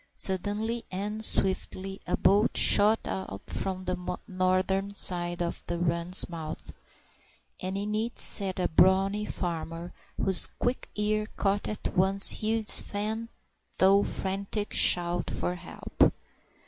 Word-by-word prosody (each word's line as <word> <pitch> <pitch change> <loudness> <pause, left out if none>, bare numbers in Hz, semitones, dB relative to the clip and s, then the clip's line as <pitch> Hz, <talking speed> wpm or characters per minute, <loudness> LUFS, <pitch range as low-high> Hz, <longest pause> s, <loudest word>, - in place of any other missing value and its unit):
Suddenly 210 +5 -1
and 210 +3 -5
swiftly 195 -1 -2
a 180 - -1
boat 205 +4 +2
shot 215 +2 +6
out 95 +1 -6
from 185 -1 -5
the 180 -1 -4
northern 190 +2 -1
side 175 -2 +3
of 170 - -5
the 175 - -3
run's 170 +1 0
mouth, 160 -2 -8 0.9
and 185 +1 -4
in 205 +1 -4
it 225 +3 -3
sat 190 -2 +4
a 180 - 0
brawny 195 +4 +2
farmer, 170 -2 -6 0.2
whose 190 -1 +3
quick 245 +2 -3
ear 210 0 -1
caught 200 0 -1
at 215 - -6
once 195 +1 +6
Hugh's 220 0 +2
faint 220 +3 -5 0.5
though 195 +1 +4
frantic 200 +2 -4
shout 175 0 +2
for 175 - -3
help. 180 0 -1
190 Hz, 125 wpm, -27 LUFS, 180-210 Hz, 0.9 s, shot